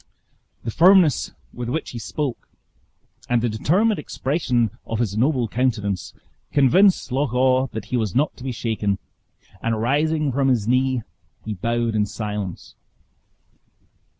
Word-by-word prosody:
The 115 - -3
firmness 175 - +5 0.2
with 120 -1 -5
which 155 +5 -3
he 120 - -6
spoke, 140 +2 -4 0.8
and 120 -1 +3
the 120 +1 0
determined 185 - +2
expression 130 - 0
of 115 - -4
his 110 -4 -1
noble 125 +1 +2
countenance, 110 -5 -1 0.4
convinced 150 +5 +4
Loch 130 -1 0
awe 130 +1 +3
that 110 -4 -6
he - - +3
was 110 -6 -2
not 145 +4 +1
to 125 - -11
be 130 - -3
shaken; 110 -4 -1 0.6
and 115 -1 -1
rising 150 +5 +1
from 135 +1 +1
his 120 -5 +1
knee, 130 0 +2 0.4
he 110 - -3
bowed 115 +3 -1
in 105 -1 +1
silence. 105 -4 -5
125 Hz, 140 wpm, -22 LUFS, 110-140 Hz, 0.8 s, firmness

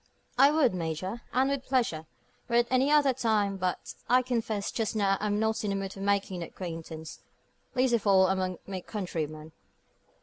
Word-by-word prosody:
"I 275 +3 +7
would, 295 -7 +3
Major, 180 +6 -3
and 260 +2 +2
with 280 -2 -2
pleasure, 230 -13 0 0.4
were 235 - 0
it 240 0 +5
any 260 +2 +3
other 295 -3 +4
time. 215 -5 +1
But, 185 -1 -3 0.2
I 250 +1 +5
confess, 225 -5 -2
just 225 -1 -2
now 200 -2 +2
I'm 210 0 0
not 220 0 0
in 210 - -1
the 195 - 0
mood 195 -1 -4
for - - -11
making 195 -2 0
new 170 - -5
acquaintance 165 -3 -7 0.6
least 255 -1 +2
of 225 -3 +1
all 190 -1 +6
among 185 -1 0
my 190 -2 -5
countrymen. 160 -6 -5
200 Hz, 180 wpm, -29 LUFS, 185-240 Hz, 0.6 s, I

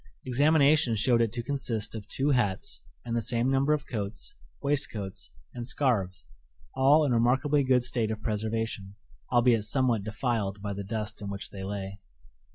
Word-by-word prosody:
Examination 145 -1 +4
showed 115 +2 +3
it 115 -2 +1
to 120 -1 -3
consist 120 -6 -1
of 105 -2 -7
two 140 +5 +1
hats, 95 - -1 0.2
and 115 -1 -2
the 115 - +1
same 120 +2 +1
number 135 +2 +2
of 150 -1 0
coats, 100 - -4 0.3
waistcoats, 125 -9 -2 0.2
and 120 -1 -6
scarves 110 -10 0 0.5
all 145 +4 +5
in 140 - 0
a - - +3
remarkably 135 +5 +2
good 130 -2 +3
state 115 -3 +2
of 110 -1 -3
preservation, 110 -2 -3 0.4
albeit 120 -3 +4
somewhat 115 -1 +1
defiled 110 -2 -2
by 100 0 -4
the 100 0 -5
dust 105 +1 -5
in 100 - -5
which 100 0 -5
they 95 -1 -7
lay. 100 0 -5
115 Hz, 165 wpm, -28 LUFS, 105-130 Hz, 0.5 s, all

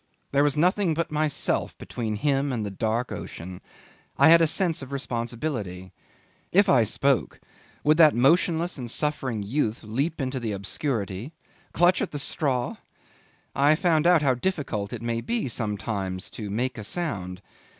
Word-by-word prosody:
There 140 - +3
was 145 0 +1
nothing 180 +1 +2
but 170 0 -2
myself 150 -1 0
between 110 -3 -4
him 140 +4 0
and 115 -4 -2
the 100 - -4
dark 110 +5 -1
ocean. 90 +2 -7 0.6
I - - +7
had 165 0 +8
a 165 - +5
sense 165 -1 0
of 135 0 -9
responsibility. 115 - -4 0.6
If 200 +3 +5
I 125 -10 +5
spoke, 135 +4 0 0.4
would 155 +1 +4
that 155 -3 +7
motionless 165 +5 +2
and 120 -2 -5
suffering 130 -6 -2
youth 115 0 -1
leap 135 +10 -2
into 130 -1 -2
the 115 -3 -3
obscurity 100 - -3 0.4
clutch 175 +2 +3
at - - -1
the 145 - -5
straw? 135 -3 0 0.8
I 145 +3 +5
found 165 -2 +2
out 175 -4 +5
how 135 -2 +4
difficult 125 - -2
it 120 -1 -6
may 115 0 -1
be 230 - -2
sometimes 105 -5 -3
to 105 -3 -6
make 120 +4 -2
a - - -6
sound. 100 - -4
130 Hz, 160 wpm, -25 LUFS, 110-155 Hz, 0.8 s, had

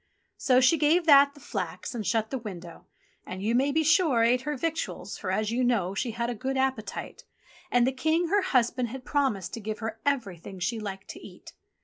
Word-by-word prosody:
So 255 -1 +3
she 260 +5 +4
gave 320 +3 +3
That 280 -2 +6
the - - -14
flax 185 - -5
and 230 -3 -4
shut 220 -1 0
the 265 - -2
window 180 -6 -9 0.4
and, 185 +1 -7
you 220 +3 +1
may 270 +4 +2
be 320 +2 +2
sure, 315 -7 +3
ate 245 +2 +3
her 295 +1 -3
victuals, 325 +3 -3
for, 190 - -4
as 215 +3 0
you 250 +2 0
know, 215 -7 +1
she 235 +5 -2
had 235 +1 -2
a 245 - -2
good 265 +4 -3
appetite, 265 -4 -3 0.5
and 245 -4 +3
the 260 - +2
King, 320 +5 0
her 405 +2 +3
husband, 250 -7 +1
had 255 +2 -8
promised 265 - -1
to - - -4
give 215 0 -4
her 225 0 -5
everything 200 - -2
she 220 +6 -2
liked 195 -2 -7
to - - -8
eat. - - -13
245 Hz, 215 wpm, -27 LUFS, 215-280 Hz, 0.5 s, That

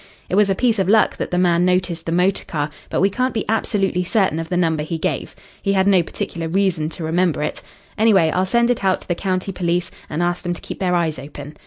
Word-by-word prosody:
It - - 0
was 205 0 +4
a 195 - +2
piece 230 -1 +1
of 190 -1 +1
luck 215 0 +4
that - - -3
the 180 - -1
man 175 -1 +3
noticed 180 -2 0
the - - -1
motor 180 +3 +2
car, 150 -2 -3 0.2
but - - 0
we 195 +1 +3
can't 255 +3 -1
be 220 - -1
absolutely 200 -4 0
certain 190 -4 +1
of 165 0 -5
the 180 - 0
number 165 -3 +1
he 160 +2 -3
gave. - - -3 0.3
He 195 - +1
had 190 -1 +3
no 190 -3 +5
particular 165 0 -4
reason 175 -3 0
to 165 - -7
remember 165 -1 +1
it. - - -3 0.4
Anyway, 195 -8 +4
I'll 185 +1 0
send 235 +3 +3
it 235 - -2
out 190 -1 +2
to - - -14
the 175 - +1
county 185 +1 -2
police, 175 -1 -1 0.2
and 160 +3 -1
ask 175 0 -1
them 175 -1 -2
to - - -10
keep - - -7
their 180 -2 +1
eyes 165 -5 0
open. 145 +2 -9
180 Hz, 250 wpm, -20 LUFS, 165-195 Hz, 0.4 s, no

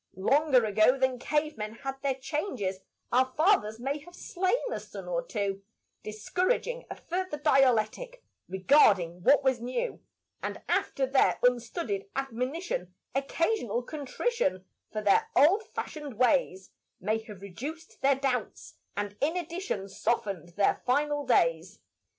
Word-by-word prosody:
Longer 260 - +3
ago 215 +5 +4
than 260 -1 +1
cave 300 -1 -1
men 210 +1 -4
had 270 +2 -6
their 275 -2 0
changes 260 - -3 0.3
Our 260 +1 +3
fathers 305 - +3
may 275 +4 -2
have 350 +4 -14
slain 375 +6 0 0.2
a - - -2
son - - -9
or - - -1
two, 200 - -3 0.4
Discouraging 365 - -1
a - - -5
further 365 -2 -3
dialectic 270 - +2 0.3
Regarding 190 - +4
what 280 +9 +5
was 260 -3 +2
new; 255 - -3 0.4
And - - -4
after 270 - +1
their 265 0 +3
unstudied 240 - 0
admonition 255 - -3 0.2
Occasional 275 - 0
contrition 295 - -2 0.3
For 215 -1 -3
their 200 - +3
old 375 +11 +5
fashioned 295 -5 -5
ways 245 -7 +2 0.3
May 215 +4 0
have 205 -4 -11
reduced 290 - -8
their 275 0 +4
doubts, 255 -4 -3 0.2
and 205 0 -3
in 315 +5 +1
addition 340 - -3
Softened 195 -4 -2
their 205 - +2
final 290 +2 +1
days. 165 -6 +2
260 Hz, 135 wpm, -29 LUFS, 210-305 Hz, 0.4 s, what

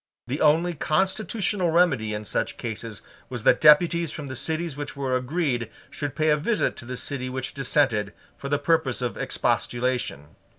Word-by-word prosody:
The 135 +5 -3
only 160 +3 +4
constitutional 190 +4 0
remedy 160 -11 +2
in 105 0 -5
such - - -2
cases 110 -3 -5 0.3
was 120 -4 -5
that 125 - +4
deputies 165 +1 +5
from 145 -3 -7
the 130 - -5
cities 160 +2 -3
which 145 0 -6
were 135 -2 -1
agreed 130 -3 -1 0.2
should 145 -2 -4
pay 155 -1 +2
a 150 - +4
visit 215 +9 0
to 120 - -9
the 125 +1 -5
city 130 -2 -2
which 130 0 -4
dissented, 130 -6 +1 0.2
for 140 - -7
the 145 - +2
purpose 140 -4 +1
of 120 - -2
expostulation. 120 - -1
140 Hz, 170 wpm, -25 LUFS, 125-160 Hz, 0.3 s, deputies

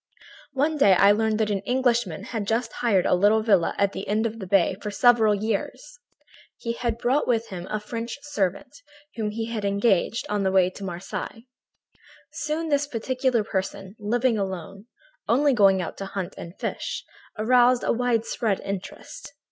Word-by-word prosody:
"One 300 +3 +1
day 200 -8 +6
I 200 +3 +6
learned 220 +1 +1
that 215 -1 +1
an 200 - 0
Englishman 235 -5 0
had 220 -3 -4
just 225 +1 -1
hired 205 -7 +1
a - - +3
little 205 +4 +4
villa 195 -6 +2
at 200 -1 +2
the 195 - -6
end 215 +2 +1
of 225 0 -3
the 190 - -6
bay 185 -1 +3
for 210 - -4
several 220 -1 +4
years. 225 +8 -4 0.6
He 230 -1 -3
had 235 -1 -2
brought 255 +5 +1
with 230 -2 0
him 180 -1 -7
a 215 - -2
French 230 +3 -5
servant, 280 - -3 0.3
whom 220 -2 -2
he 225 +2 -4
had 215 -2 -3
engaged 200 +1 +1
on 205 -1 -1
the 190 -1 +1
way 190 -1 +5
at 185 +2 -7
Marseilles. 195 +5 -6 0.9
"Soon 315 +2 -3
this 290 0 +1
peculiar 255 -1 0
person, 195 -1 -4
living 230 +2 +1
alone, 195 +2 -5 0.4
only 280 +4 +4
going 195 -5 +4
out - - -7
to 195 - -5
hunt 195 -1 -5
and 170 +2 -10
fish, - - -4 0.3
aroused 245 +2 +4
a - - +2
widespread 230 -3 0
interest. 200 - -7
220 Hz, 170 wpm, -25 LUFS, 195-245 Hz, 0.9 s, day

